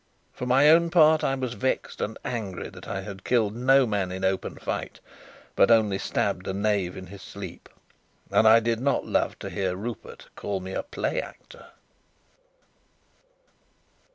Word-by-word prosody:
For 125 Hz, -, -5 dB
my 135 Hz, +4 st, +5 dB
own 170 Hz, +2 st, +6 dB
part, 160 Hz, -2 st, +5 dB
I 135 Hz, -, +1 dB
was 130 Hz, -3 st, -3 dB
vexed 130 Hz, +1 st, -2 dB
and 110 Hz, -, -3 dB
angry 105 Hz, -7 st, -4 dB
that -, -, -12 dB
I 95 Hz, -, -3 dB
had 95 Hz, -1 st, -9 dB
killed 110 Hz, -4 st, +1 dB
no 135 Hz, +2 st, +4 dB
man 100 Hz, -5 st, -1 dB
in 95 Hz, +1 st, -3 dB
open 95 Hz, 0 st, -1 dB
fight, -, -, -5 dB, 0.6 s
but -, -, +5 dB
only 110 Hz, -4 st, +4 dB
stabbed 90 Hz, -, -1 dB
a 95 Hz, -, -2 dB
knave 100 Hz, -3 st, 0 dB
in 95 Hz, -, -8 dB
his 95 Hz, +2 st, -11 dB
sleep. -, -, -9 dB, 0.6 s
And 110 Hz, -, +4 dB
I 115 Hz, +1 st, +7 dB
did 115 Hz, 0 st, 0 dB
not 140 Hz, +3 st, 0 dB
love -, -, 0 dB
to -, -, -7 dB
hear 95 Hz, -2 st, -1 dB
Rupert 110 Hz, +4 st, -8 dB
call 100 Hz, -1 st, -3 dB
me 95 Hz, 0 st, -7 dB
a -, -, -1 dB
play -, -, -2 dB
actor. -, -, -13 dB
110 Hz, 165 wpm, -26 LUFS, 95-130 Hz, 0.6 s, I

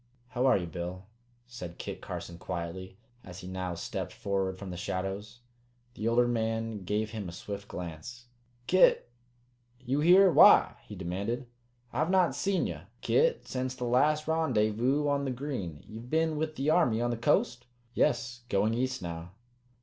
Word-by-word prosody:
"How 125 Hz, +2 st, +1 dB
are 130 Hz, -, +5 dB
you, 90 Hz, -, -3 dB
Bill?" 90 Hz, +2 st, -6 dB, 0.4 s
said 90 Hz, -9 st, -8 dB
Kit -, -, -6 dB
Carson 85 Hz, -1 st, -7 dB
quietly, 95 Hz, +3 st, -5 dB, 0.3 s
as 90 Hz, 0 st, -10 dB
he 90 Hz, -, -9 dB
now 95 Hz, -1 st, -4 dB
stepped 85 Hz, -, -4 dB
forward 95 Hz, -2 st, -2 dB
from 95 Hz, -1 st, -7 dB
the -, -, -5 dB
shadows. 95 Hz, +6 st, -4 dB, 0.5 s
The 110 Hz, -2 st, -3 dB
older 120 Hz, +1 st, +4 dB
man 115 Hz, -3 st, -2 dB
gave 105 Hz, +2 st, -1 dB
him 105 Hz, -5 st, -5 dB
a -, -, -7 dB
swift 100 Hz, +3 st, -7 dB
glance. 90 Hz, +8 st, -7 dB, 0.4 s
"Kit! 180 Hz, -6 st, +4 dB, 0.7 s
You 130 Hz, +2 st, -1 dB
here 180 Hz, +4 st, +7 dB
why?" -, -, +7 dB
he 105 Hz, -, -8 dB
demanded. 100 Hz, +7 st, -3 dB, 0.5 s
"I've 160 Hz, -, 0 dB
not 185 Hz, -6 st, +3 dB
seed 190 Hz, +7 st, 0 dB
ye, -, -, -5 dB, 0.2 s
Kit, 480 Hz, +1 st, +2 dB
sence 130 Hz, 0 st, -3 dB
the 125 Hz, -, -6 dB
last 150 Hz, +6 st, +2 dB
Rendyvous 130 Hz, -3 st, +1 dB
on 140 Hz, -1 st, +1 dB
the 135 Hz, -, -2 dB
Green. 125 Hz, -, -5 dB
Ye've 115 Hz, +3 st, -9 dB
been 160 Hz, +1 st, +1 dB
with 155 Hz, +1 st, -2 dB
the 140 Hz, +3 st, +1 dB
Army 155 Hz, -10 st, +3 dB
on 120 Hz, 0 st, 0 dB
the -, -, -1 dB
coast?" 120 Hz, +1 st, +1 dB, 0.3 s
"Yes. 120 Hz, 0 st, 0 dB
Going 105 Hz, +3 st, +2 dB
east 130 Hz, 0 st, -1 dB
now." 85 Hz, +1 st, -6 dB
115 Hz, 165 wpm, -30 LUFS, 95-130 Hz, 0.7 s, here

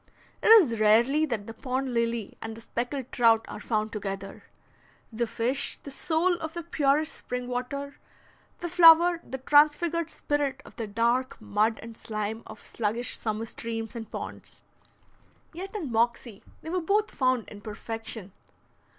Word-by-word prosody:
It -, -, 0 dB
is 355 Hz, -, +7 dB
rarely 240 Hz, +9 st, +4 dB
that 225 Hz, -7 st, -3 dB
the 225 Hz, -, -8 dB
pond 255 Hz, +2 st, -3 dB
lily 235 Hz, -2 st, -1 dB
and 225 Hz, 0 st, -6 dB
the -, -, -9 dB
speckled 245 Hz, +3 st, -4 dB
trout 230 Hz, -2 st, +4 dB
are 210 Hz, -, -7 dB
found 215 Hz, 0 st, -1 dB
together, 195 Hz, -2 st, -6 dB, 0.7 s
the 235 Hz, +1 st, -1 dB
fish 250 Hz, +5 st, -1 dB
the 280 Hz, -, -8 dB
soul 325 Hz, +6 st, +1 dB
of 320 Hz, -1 st, -6 dB
the 340 Hz, -, -4 dB
purest 300 Hz, +1 st, +1 dB
spring 250 Hz, 0 st, -5 dB
water, 280 Hz, +3 st, -4 dB, 0.6 s
the 345 Hz, -, -2 dB
flower 340 Hz, 0 st, +7 dB
the 265 Hz, -, -6 dB
transfigured 300 Hz, +4 st, +3 dB
spirit 280 Hz, -3 st, -2 dB
of -, -, -14 dB
the 225 Hz, -, -3 dB
dark 235 Hz, +5 st, 0 dB
mud 215 Hz, +1 st, 0 dB
and 230 Hz, 0 st, -9 dB
slime 215 Hz, 0 st, -4 dB
of -, -, -11 dB
sluggish 230 Hz, +2 st, 0 dB
summer 215 Hz, 0 st, -2 dB
streams 225 Hz, 0 st, -5 dB
and 225 Hz, -2 st, -6 dB
ponds; -, -, -8 dB, 0.9 s
yet 380 Hz, +5 st, -7 dB
in 320 Hz, -, -4 dB
Moxie 230 Hz, -2 st, 0 dB, 0.2 s
they 320 Hz, -, -6 dB
were 365 Hz, 0 st, 0 dB
both 415 Hz, +5 st, +1 dB
found 255 Hz, -3 st, +1 dB
in 205 Hz, -, -11 dB
perfection. 220 Hz, -1 st, -6 dB
245 Hz, 155 wpm, -27 LUFS, 225-295 Hz, 0.9 s, is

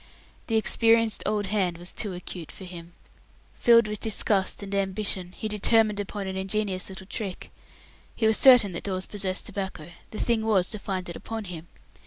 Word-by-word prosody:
The 225 Hz, -, 0 dB
experienced 225 Hz, 0 st, +3 dB
"old 210 Hz, -1 st, 0 dB
hand" 185 Hz, -4 st, 0 dB
was 175 Hz, +1 st, -7 dB
too 205 Hz, -3 st, -2 dB
acute 175 Hz, -2 st, -7 dB
for -, -, -11 dB
him. 175 Hz, -2 st, -10 dB, 0.6 s
Filled 235 Hz, -2 st, +5 dB
with 210 Hz, -1 st, -4 dB
disgust 205 Hz, -2 st, 0 dB
and 200 Hz, 0 st, -6 dB
ambition, 195 Hz, -2 st, -1 dB
he 220 Hz, -, -3 dB
determined 210 Hz, 0 st, +2 dB
upon 205 Hz, 0 st, -4 dB
an 190 Hz, 0 st, -4 dB
ingenious 190 Hz, -1 st, -1 dB
little 190 Hz, 0 st, -8 dB
trick. 195 Hz, -1 st, -5 dB, 0.6 s
He 225 Hz, -, 0 dB
was 220 Hz, 0 st, +6 dB
certain 250 Hz, -7 st, +7 dB
that 170 Hz, -, -6 dB
Dawes 185 Hz, -2 st, -2 dB
possessed 195 Hz, -2 st, -4 dB
tobacco; 190 Hz, -4 st, -6 dB, 0.2 s
the 215 Hz, -, -8 dB
thing 230 Hz, -1 st, +1 dB
was 200 Hz, -5 st, +2 dB
to 215 Hz, -, -4 dB
find 190 Hz, -2 st, -4 dB
it 170 Hz, -, -6 dB
upon 225 Hz, -1 st, -5 dB
him. 175 Hz, -3 st, -8 dB
200 Hz, 180 wpm, -26 LUFS, 185-215 Hz, 0.6 s, certain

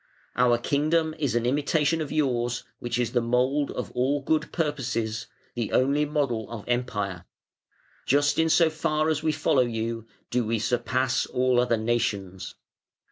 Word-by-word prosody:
Our 125 Hz, -1 st, +4 dB
kingdom 155 Hz, +5 st, +1 dB
is 140 Hz, -6 st, 0 dB
an 120 Hz, 0 st, +1 dB
imitation 150 Hz, +4 st, +1 dB
of 150 Hz, -, -4 dB
yours, 125 Hz, -5 st, 0 dB, 0.2 s
which 120 Hz, 0 st, -2 dB
is 120 Hz, -2 st, 0 dB
the 120 Hz, -1 st, +2 dB
mould 130 Hz, +5 st, +1 dB
of -, -, -5 dB
all 135 Hz, +3 st, 0 dB
good 155 Hz, +2 st, 0 dB
purposes, 120 Hz, -8 st, -2 dB, 0.3 s
the 115 Hz, -3 st, -3 dB
only 140 Hz, +3 st, +3 dB
model 140 Hz, -7 st, -1 dB
of 115 Hz, -3 st, -7 dB
Empire, 105 Hz, -7 st, -2 dB, 0.8 s
Just 145 Hz, +3 st, +3 dB
in 160 Hz, 0 st, +3 dB
so 160 Hz, 0 st, +4 dB
far 155 Hz, 0 st, 0 dB
as 155 Hz, -1 st, 0 dB
we 160 Hz, 0 st, +1 dB
follow 145 Hz, -3 st, +2 dB
you 115 Hz, -1 st, -2 dB, 0.2 s
do 125 Hz, 0 st, +1 dB
we 115 Hz, +1 st, 0 dB
surpass 125 Hz, +3 st, 0 dB
all 125 Hz, -1 st, +2 dB
other 120 Hz, -2 st, +1 dB
nations. 105 Hz, -5 st, -2 dB
125 Hz, 155 wpm, -26 LUFS, 115-150 Hz, 0.8 s, Our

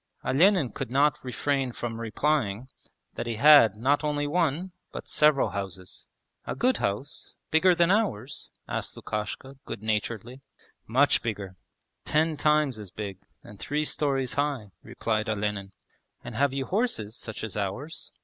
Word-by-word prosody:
Olenin 165 Hz, -, +4 dB
could -, -, -5 dB
not 145 Hz, +3 st, +2 dB
refrain 130 Hz, +1 st, -1 dB
from 115 Hz, -1 st, -4 dB
replying 115 Hz, -1 st, 0 dB, 0.5 s
that -, -, -4 dB
he 115 Hz, -, -1 dB
had 140 Hz, -5 st, +7 dB
not 140 Hz, +7 st, +1 dB
only 145 Hz, -1 st, 0 dB
one, 170 Hz, +3 st, 0 dB, 0.2 s
but -, -, -7 dB
several 150 Hz, -2 st, +3 dB
houses. 95 Hz, -2 st, -6 dB, 0.4 s
'A -, -, -2 dB
good 255 Hz, +1 st, +2 dB
house? 105 Hz, +9 st, -3 dB, 0.2 s
Bigger 175 Hz, +3 st, +5 dB
than 170 Hz, +1 st, +4 dB
ours?' 190 Hz, -, -1 dB, 0.2 s
asked -, -, -3 dB
Lukashka 110 Hz, +6 st, -5 dB
good 100 Hz, -, -7 dB
naturedly. 110 Hz, +3 st, -2 dB, 0.5 s
'Much 130 Hz, +5 st, +4 dB
bigger; 100 Hz, -5 st, -4 dB, 0.5 s
ten 155 Hz, +1 st, +1 dB
times 150 Hz, -5 st, +2 dB
as 105 Hz, -3 st, -7 dB
big 100 Hz, -1 st, -6 dB, 0.2 s
and 100 Hz, -, -13 dB
three 150 Hz, +1 st, -1 dB
storeys 135 Hz, -4 st, 0 dB
high,' 140 Hz, -8 st, -1 dB
replied 110 Hz, -1 st, -2 dB
Olenin. 105 Hz, -2 st, -2 dB, 0.5 s
'And 120 Hz, -, -7 dB
have 140 Hz, +4 st, +2 dB
you 135 Hz, 0 st, -2 dB
horses 185 Hz, -, -1 dB
such 110 Hz, -3 st, -7 dB
as 110 Hz, -, -5 dB
ours?' 105 Hz, +11 st, -4 dB
130 Hz, 145 wpm, -27 LUFS, 105-150 Hz, 0.5 s, had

